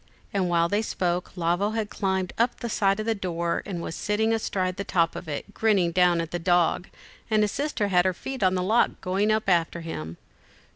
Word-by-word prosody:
and 190 -3 +1
while 170 -1 +3
they 205 +4 +1
spoke, 180 -4 -2
Lavo 175 +5 +1
had 215 -1 -2
climbed 190 -2 -1
up 235 +1 +1
the 235 - -4
side 195 -1 +2
of 215 - -2
the 225 - +2
door, 170 -4 -2
and 175 -4 -4
was - - -5
sitting 220 +5 0
astride 195 -4 -1
on - - -4
the 200 - -2
top 170 -3 +1
of 175 - -7
it, 155 +7 -5
grinning 200 -6 +2
down 180 -1 +3
at 165 -1 -3
the 175 - -2
dog, 175 +1 +2 0.4
and 215 -1 +3
his 210 - 0
sister 265 -8 -1
had 180 -2 +4
her 185 - +2
feet 265 +5 -6
on 185 -1 +3
the 180 - 0
lock, 220 +6 +2
going 195 +3 +1
up 215 -1 0
after 170 -2 +1
him. 85 - -6
185 Hz, 225 wpm, -26 LUFS, 175-210 Hz, 0.4 s, had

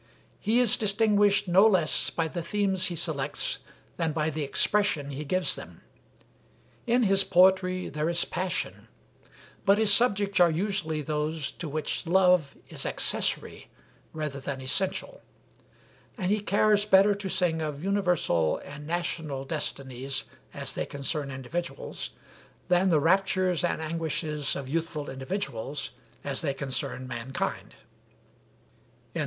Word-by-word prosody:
He 225 +4 +2
is 245 -4 +4
distinguished 205 -1 +3
no 190 +5 +6
less 180 -7 +3
by 165 -1 -1
the 170 +2 -4
themes 190 +1 0
he 175 - -3
selects 145 -4 -1 0.4
than 165 -2 0
by 155 0 0
the 155 +1 -4
expression 145 -1 +1
he 140 +2 -5
gives 185 +5 +1
them. - - -11 1.1
In 245 +1 +3
his 195 -2 +5
poetry 185 0 +3
there 150 +2 -2
is 170 0 +2
passion, 180 +1 -3 0.8
but 200 0 +4
his 215 -1 +4
subjects 205 -4 +2
are 175 -1 +6
usually 160 -3 -1
those 150 0 -2
to 170 - -7
which 155 +3 -2
love 180 -4 +3
is - - -3
accessory - - -1 0.4
rather 150 -3 -4
than 135 0 -5
essential; 190 - -2 1.0
and 185 -3 -1
he 210 - +2
cares 205 0 +2
better 205 0 +5
to 200 -1 -5
sing 170 -3 +1
of 150 -1 -4
universal 180 - +1
and 145 +1 -9
national 160 -5 -2
destinies 135 -3 -3 0.3
as - - -5
they - - -3
concern 140 +1 -2
individuals, 170 - -5 0.6
than 180 +1 +3
the 160 -4 +4
raptures 185 +1 +2
and 170 -2 -1
anguishes 155 -2 -2
of 140 -2 -5
youthful 155 0 -3
individuals 135 - -4 0.3
as 140 -1 -3
they 140 -4 -1
concern 130 -1 -2
mankind." 125 +1 -4
170 Hz, 130 wpm, -27 LUFS, 145-195 Hz, 1.1 s, no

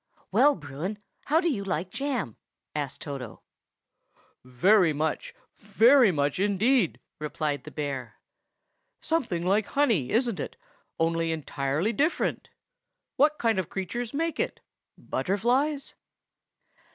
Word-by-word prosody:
"Well, 295 0 +5
Bruin, 150 +7 -5 0.3
how 310 +3 +3
do 345 - 0
you 235 -11 0
like 185 -1 -2
jam?" 250 - -2 0.4
asked 145 -3 -4
Toto. 135 -6 -7 1.0
"Very 165 - +4
much, 155 +1 -2 0.2
very 230 +3 +5
much 145 0 0
indeed!" 205 - +2 0.2
replied 150 -1 -3
the - - -7
bear. 140 -4 -4 0.8
"Something 230 - -1
like 200 +3 +2
honey, 225 - +2
isn't 235 -3 +1
it, - - -5 0.4
only 165 0 +1
entirely 150 +5 -1
different? 300 +10 0 0.7
What 300 +2 +3
kind 225 -4 +1
of 185 - -3
creatures 220 +5 -4
make 325 +3 -2
it? - - -1 0.4
Butterflies?" 255 +9 0
190 Hz, 115 wpm, -27 LUFS, 150-245 Hz, 1.0 s, Well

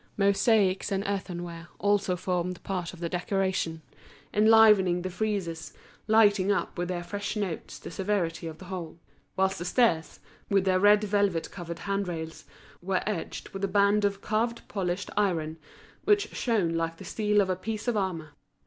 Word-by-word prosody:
Mosaics 200 -1 +3
and 195 0 0
earthenware 175 -4 -4
also 200 -2 +1
formed 180 0 -2
part 180 -3 -3
of 180 - -13
the 170 - -1
decoration, 180 -2 -1 0.5
enlivening 210 -5 +6
the 185 - -3
friezes, 180 -6 -3 0.3
lighting 205 -3 +4
up 205 - -1
with 175 -1 -2
their 175 -1 -3
fresh 200 +5 -4
notes 195 -6 -4
the - - -9
severity 175 -3 -1
of 160 -1 -7
the 185 - -11
whole; 175 -4 -6 0.4
whilst 190 0 +1
the 175 - -4
stairs, 180 -5 +1 0.3
with 195 -1 +3
their 185 -1 +3
red 205 +2 +5
velvet 200 -5 0
covered 170 -3 -6
hand 200 +1 -2
rails, 160 -2 -6 0.4
were 185 +1 -1
edged 210 -6 -4
with 195 0 -7
a - - +3
band 200 +2 +3
of 200 -1 0
carved 230 +2 -1
polished 190 -1 -3
iron, 165 -6 0 0.5
which 415 0 +3
shone 205 -9 +1
like 165 0 -2
the 195 - -10
steel 210 +2 +1
of 190 -2 +2
a - - 0
piece 215 +4 -5
of 240 - +1
armour. 180 -6 -2
190 Hz, 165 wpm, -28 LUFS, 175-205 Hz, 0.5 s, enlivening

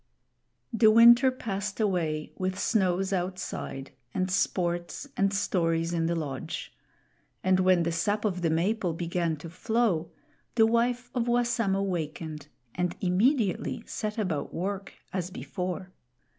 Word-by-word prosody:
The 220 -1 +6
winter 235 +4 +8
passed 205 -5 -4
away 165 -7 0
with 185 0 -2
snows 195 -2 +1
outside, 180 -7 -4 0.2
and 185 0 0
sports 175 +5 -1
and 195 0 +2
stories 165 -4 0
in 165 -1 +1
the 170 - 0
lodge; 145 -5 -5 0.7
and 185 0 +3
when 185 -2 +4
the 170 - 0
sap 205 +6 0
of 185 -4 -1
the 165 - +2
maple 180 +3 +1
began 170 0 -1
to 165 +3 -9
flow, 210 -5 0 0.5
the 225 -2 +6
wife 240 +2 +1
of 245 -2 0
Wassamo 235 -5 +1
wakened 160 -4 -4 0.3
and 180 -1 -1
immediately 200 - +1
set 215 0 -4
about 185 -9 -2
work 195 +2 -3 0.2
as 180 -2 -2
before. 185 0 -5
185 Hz, 130 wpm, -28 LUFS, 170-215 Hz, 0.7 s, winter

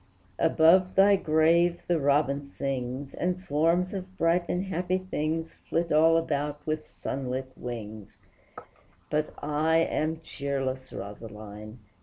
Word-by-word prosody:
Above 180 +3 +4
thy 200 +1 +6
grave 170 +1 +3
the 175 -2 +1
robin 140 0 +2
sings, 135 -1 -4
And 180 +1 -1
swarms 170 +3 +1
of 190 -1 -7
bright 170 +1 +2
and 180 +1 0
happy 185 0 -1
things 165 -3 -3 0.2
Flit 170 0 0
all 160 +2 +5
about 150 -2 -1
with 155 0 -3
sunlit 130 0 -4
wings, 110 -4 -7 0.9
But 155 0 0
I 150 +2 +1
am 160 -1 0
cheerless, 135 -3 -3
Rosaline! 105 +1 -8
155 Hz, 120 wpm, -28 LUFS, 135-170 Hz, 0.9 s, thy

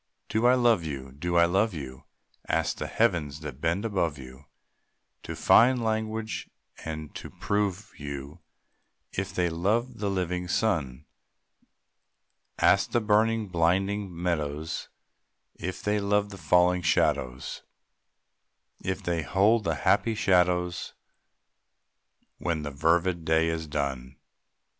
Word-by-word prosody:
Do 110 +2 +2
I 125 - +6
love 120 -7 +3
you? 70 -4 -6
Do 85 +6 -2
I 85 - +7
love 95 +3 +1
you? 65 -4 -8 0.4
Ask - - 0
the - - -4
heavens 80 -10 0
that 75 -3 -8
bend 85 +6 0
above 85 -8 0
you 65 +1 -12 0.8
To - - -6
find 125 +2 +5
language 110 0 -2 0.3
and 80 -2 -6
to - - -8
prove 100 -1 -2
you 70 +2 -7 0.7
If 95 0 -3
they 90 -1 +1
love 105 +9 -1
the 105 -1 -1
living 90 -2 -2
sun. 80 - -1 1.5
Ask - - +3
the 120 - +4
burning, 110 0 +2
blinded 95 +4 +1
meadows 80 -3 -3 0.6
If 90 +1 -6
they 105 0 +1
love 100 0 +1
the 100 - -8
falling 90 0 +3
shadows, 65 -6 0 1.2
If 95 0 -3
they 85 -2 0
hold 105 +7 +2
the 80 - +1
happy 115 -1 +3
shadows 90 -3 +1 1.5
When 85 -3 -1
the 75 - -4
fervid 85 +4 +1
day 80 +1 +2
is 80 -1 -3
done. 70 -3 -3
90 Hz, 125 wpm, -27 LUFS, 80-105 Hz, 1.5 s, I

